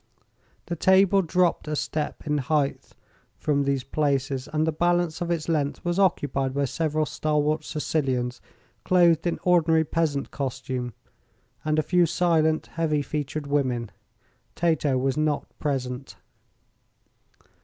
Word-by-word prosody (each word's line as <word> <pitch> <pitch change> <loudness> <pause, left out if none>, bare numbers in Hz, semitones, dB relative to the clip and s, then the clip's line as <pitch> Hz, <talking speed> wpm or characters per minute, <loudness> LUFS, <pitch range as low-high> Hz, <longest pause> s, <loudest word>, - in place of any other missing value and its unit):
The 175 - -3
table 190 +3 +4
dropped 180 -1 +1
a 150 - -1
step 150 0 -3
in 150 -1 0
heighth 140 +1 -1 0.4
from 145 -2 0
these 135 -2 0
places, 135 -2 -1
and 155 0 +1
the 160 - +1
balance 175 0 +1
of 175 - -2
its 170 -3 -1
length 150 -3 -1
was 175 +2 0
occupied 140 -8 +1
by 140 0 +1
several 155 +3 -1
stalwart 150 0 0
Sicilians, 130 -6 -2 0.4
clothed 175 -2 +4
in 170 - 0
ordinary 165 -3 +4
peasant 155 -3 -1
costume, 130 -3 -4 0.7
and 155 0 0
a 155 - +3
few 175 +2 +3
silent, 160 -2 +2
heavy 155 -3 -1
featured 150 +1 -4
women. 130 -6 -1 0.6
Tato 155 -5 +1
was 135 +2 0
not 155 -1 0
present. 130 -2 -3
150 Hz, 130 wpm, -25 LUFS, 140-165 Hz, 0.7 s, table